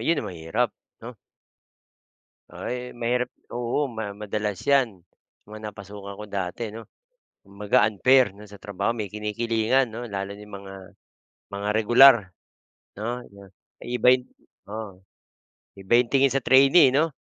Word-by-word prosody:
yun 160 -3 0
ang - - -5
mahirap, 90 +9 -1 0.3
'no? 120 0 -9 1.4
Ay 125 0 -5
mahirap 120 +1 -2 0.2
oo, 125 +4 -1
ma 110 -4 -5
madalas 105 -1 -4
'yan, 125 -9 +2 0.5
mga 110 0 -8
napasukan 100 0 -10
ko - - -6
dati 100 +3 -4
'no. 110 +2 -9 0.6
Kumbaga, 100 +1 +1
unfair 125 +3 +3 0.2
sa 100 - -12
trabaho 100 +1 -3
may 105 - -2
kinikilingan 110 +5 0
'no, 120 +1 -6
lalo 100 0 -4
na 100 - -12
yung 105 -1 -10
mga, 95 0 -11 0.8
mga 100 +1 -5
regular, 120 +5 +7 0.8
'no? 120 +4 -4 0.6
Iibahin 125 +1 +2 0.4
oo, 105 -2 -7 0.8
iba 95 +1 -7
yung 125 - -2
tingin 135 -1 +4
sa 135 - +1
trainee, 135 +4 +6
eh, - - +2
no? 160 +2 +2
110 Hz, 130 wpm, -24 LUFS, 100-125 Hz, 1.4 s, regular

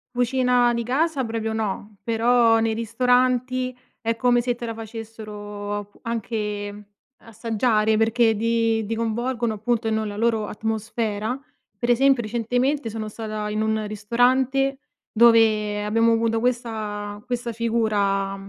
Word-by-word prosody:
Cucina 245 -1 +2
di 235 - -1
casa 275 +3 0
proprio, 225 -1 -3
no. 210 -1 -3
Però 230 0 +3
nei 225 0 +1
ristoranti 250 +2 +1 0.2
è 230 0 -1
come 245 0 +3
se 245 0 -1
te 240 - -6
la 230 - -4
facessero, 210 -2 -7
ap 205 0 -8
anche 210 -3 -4 0.4
assaggiare 220 -1 +1
perché 225 0 +3
di 225 0 +1
di 225 - -2
coinvolgono 235 +1 -1
appunto 225 +2 -1
ehm, 220 - +1
nella 215 -2 -2
loro 225 -1 +1
atmosfera. 220 +1 -2 0.4
Pre 240 0 +2
esempio 265 0 +3
recentemente 240 +3 -1
sono 215 0 -5
stata 215 -1 -5
in 215 +1 -1
un 220 0 0
ristorante, 255 +6 +1 0.3
dove 215 -2 +4
abbiamo 230 +2 +3
avuto 225 0 +1
questa 215 -4 -3
questa 245 -1 -3
figura, 210 -4 0
225 Hz, 130 wpm, -23 LUFS, 215-240 Hz, 0.4 s, dove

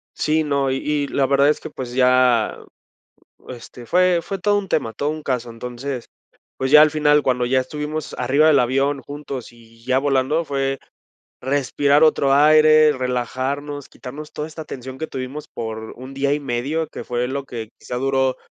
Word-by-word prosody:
Sí, 155 +1 +1
no, 140 -2 0
y 130 - 0
y 145 +1 -1
la 140 - +1
verdad 140 +1 +3
es 150 - +2
que, - - -9
pues, 125 -2 -7
ya, 125 -3 +3 0.9
este, 120 0 -10
fue 180 +2 +3
fue 195 - -5
todo 205 +2 +2
un 200 -1 -3
tema, 130 -10 -1
todo 145 +7 -2
un 155 0 -6
caso, 125 -4 -3
entonces, 125 +2 -6 0.5
pues, 130 +1 -2
ya 150 - +9
al 155 - +6
final, 150 -1 +3
cuando 125 -2 0
ya 130 +1 +2
estuvimos 150 +3 -5
arriba 140 +5 +3
del 145 -3 +5
avión 135 +3 +1
juntos 140 -3 -7
y 115 -1 -20
ya 130 +1 +2
volando, 140 +3 +1
fue 135 -1 -2 0.6
respirar 140 +2 +2
otro 140 -3 +4
aire, 155 +1 +6
relajarnos, 130 +3 -3
quitarnos 150 +4 -10
toda 150 - -4
esta 160 0 -8
tensión 130 0 -8
que 160 - -3
tuvimos 135 +3 -6
por 110 -1 -6
un 130 +2 -10
día 140 +1 0
y 150 - -3
medio, 140 +5 -2
que - - -8
fue 125 0 -2
lo 140 +1 -3
que 115 -4 -7
quizá 125 - -6
duró, 130 0 +1
135 Hz, 180 wpm, -21 LUFS, 125-150 Hz, 0.9 s, ya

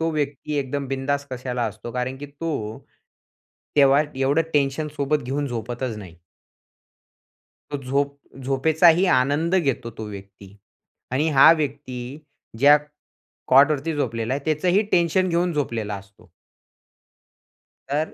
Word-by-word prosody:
तो 165 0 0
व्यक्ती 145 -1 -3
एकदम 140 0 -3
बिंधास्त 140 +1 -2
कशाला 125 -1 -3
असतो 110 +2 -7
कारण 125 +1 -3
की 145 - -7
तो, 140 -7 -5 1.0
तेव्हा 140 0 +6
एवढं 135 +4 +2
टेन्शन 145 +1 0
सोबत 145 +1 0
घेऊन 140 +4 -2
झोपतच 120 0 -4
नाही. 90 -5 -11 1.6
तो 145 - -2
झोप 140 +2 -1 0.3
झोपेचाही 160 +7 +4
आनंद 145 +7 +1
घेतो 135 -9 0
तो 110 - -5
व्यक्ती 100 -1 -12 0.6
आणि 145 +5 +1
हा 135 - +9
व्यक्ती 140 -3 -4 0.6
ज्या 145 +3 +7 0.7
कॉटवरती 145 +3 +4
झोपलेला 115 -4 -2
आहे. 140 0 -5
त्याचंही 175 +6 +2
टेन्शन 175 +2 +3
घेऊन 175 +1 +1
झोपलेला 115 -8 -2
असतो. 100 0 -13 1.6
तर 150 +3 -1
140 Hz, 120 wpm, -23 LUFS, 125-150 Hz, 1.6 s, हा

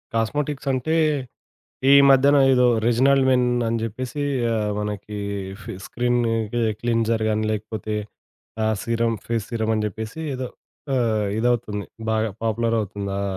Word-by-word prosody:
Cosmetics 140 +5 -1
అంటే, 130 +5 0 1.0
ఈ - - +8 0.2
మధ్యన 140 +2 +6 0.2
ఏదో 125 -1 +4 0.2
'రీజినల్ 135 +4 +4
మెన్' 125 -1 +3 0.2
అని 115 - 0
చెప్పేసి 130 +6 -4 0.6
మనకి 105 0 -4 0.5
ఫి - - -7
స్క్రీన్ 120 0 0 0.3
కి 120 - 0 0.2
క్లీన్సర్ 115 -1 +1
గాని, 110 0 0
లేకపోతే 110 0 -4 0.7
ఆ - - +2 0.2
సీరమ్ 115 -1 0
ఫేస్ 115 -3 -2
సీరమ్ 110 -2 -1
అని 110 - 0
జెప్పేసి 110 - -6
ఏదో 130 -1 -4 0.5
ఆహ్, 110 -4 +1
ఇదవుతుంది 110 -3 0 0.2
బాగా 110 0 +1
పాపులర్ 115 +1 0
అవుతుంది. 100 -1 -4
ఆ - - -1
115 Hz, 130 wpm, -23 LUFS, 110-125 Hz, 1.0 s, ఈ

